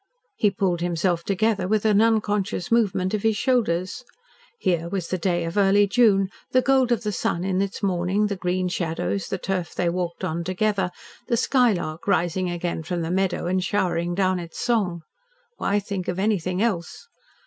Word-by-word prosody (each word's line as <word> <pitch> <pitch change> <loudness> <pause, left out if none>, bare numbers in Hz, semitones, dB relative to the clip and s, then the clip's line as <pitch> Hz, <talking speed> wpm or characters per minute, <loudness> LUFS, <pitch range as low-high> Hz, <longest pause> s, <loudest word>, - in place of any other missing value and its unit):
He 210 - +3
pulled 190 -4 -1
himself 175 0 0
together 200 0 0
with 215 +1 +1
an 210 -1 +4
unconscious 210 -4 0
movement 195 -5 +2
of 210 - 0
his 220 -1 +1
shoulders. 215 -5 0 0.5
Here 170 - 0
was 185 -3 -3
the 185 - -1
day 175 0 0
of 165 +4 -4
early 200 +1 +5
June, 200 -3 +3 0.2
the 255 - +5
gold 265 -2 +3
of 235 -1 +1
the 210 - -1
sun 175 -2 -1
in 190 0 0
its 200 +1 -4
morning, 190 +2 +1
the 205 -1 -1
green 185 0 -1
shadows, 175 +1 -2
the 195 - -2
turf 180 -2 -3
they 175 - +1
walked 175 -1 -3
on 165 +2 -2
together, 190 +1 0 0.4
the 235 - +1
skylark 210 - +1
rising 180 -1 +1
again 175 -1 -3
from 170 +1 -3
the 165 - -3
meadow 190 0 0
and 185 +1 0
showering 175 -3 0
down 185 -1 +1
its 170 -1 -9
song. 190 -8 0 0.5
Why 200 - +1
think 200 -2 -3
of 180 - -2
anything 190 -2 0
else. 190 - -2
190 Hz, 180 wpm, -24 LUFS, 175-210 Hz, 0.5 s, early